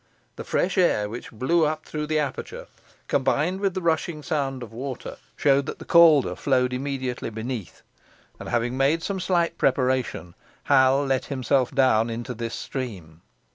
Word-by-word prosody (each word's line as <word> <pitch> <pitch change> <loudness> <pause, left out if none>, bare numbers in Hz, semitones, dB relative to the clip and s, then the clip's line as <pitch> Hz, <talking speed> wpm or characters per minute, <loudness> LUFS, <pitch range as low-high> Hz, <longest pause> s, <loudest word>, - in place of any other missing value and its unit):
The - - -7
fresh 190 +2 0
air 105 - +3
which 115 +4 -7
blew 160 +9 +1
up 155 +1 -1
through 150 -1 -4
the 155 0 0
aperture, 145 -3 -4 0.4
combined 175 +6 +1
with 195 -2 0
the 185 - -3
rushing 160 -1 0
sound 140 -6 -2
of 115 - -11
water, 130 +2 -6 0.2
showed 140 -1 +2
that - - -5
the - - -11
Calder 165 -5 +6
flowed 125 -2 +1
immediately 130 -2 -3
beneath; 110 -2 -6 0.6
and, - - -7
having 120 +1 0
made 140 +5 +2
some 195 -1 -2
slight 175 -2 0
preparation, 130 -9 0 0.3
Hal 135 0 +4
let 135 -1 0
himself 130 -1 0
down 120 -4 +3
into 120 +2 -5
the 115 0 -4
stream. 95 -12 -6
135 Hz, 160 wpm, -24 LUFS, 125-155 Hz, 0.6 s, Calder